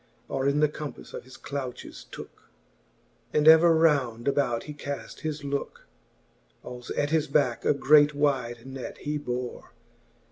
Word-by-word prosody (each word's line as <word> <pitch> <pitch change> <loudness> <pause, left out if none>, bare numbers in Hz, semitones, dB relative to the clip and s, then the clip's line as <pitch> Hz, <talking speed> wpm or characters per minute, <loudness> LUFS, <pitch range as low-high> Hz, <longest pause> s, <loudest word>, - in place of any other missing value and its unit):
Or 135 0 -1
in 145 +2 +2
the 150 - +5
compafle 150 -2 -8
of - - -7
his 130 -1 -13
douches 130 -2 -7
tooke; - - -11 0.8
And 150 0 +3
ever 160 +1 +8
round 140 -7 +2
about 135 -4 +1
he 150 - -8
caft 145 -1 -7
his 155 -2 -4
looke. 140 0 -4 0.8
Als 125 -1 -9
at 145 +1 0
his 155 -1 +2
backe 125 -7 +1
a - - +4
great 145 +2 +5
wide 130 -5 0
net 135 -1 -7
he 150 0 -3
bore. 125 -3 -5
140 Hz, 150 wpm, -27 LUFS, 125-150 Hz, 0.8 s, ever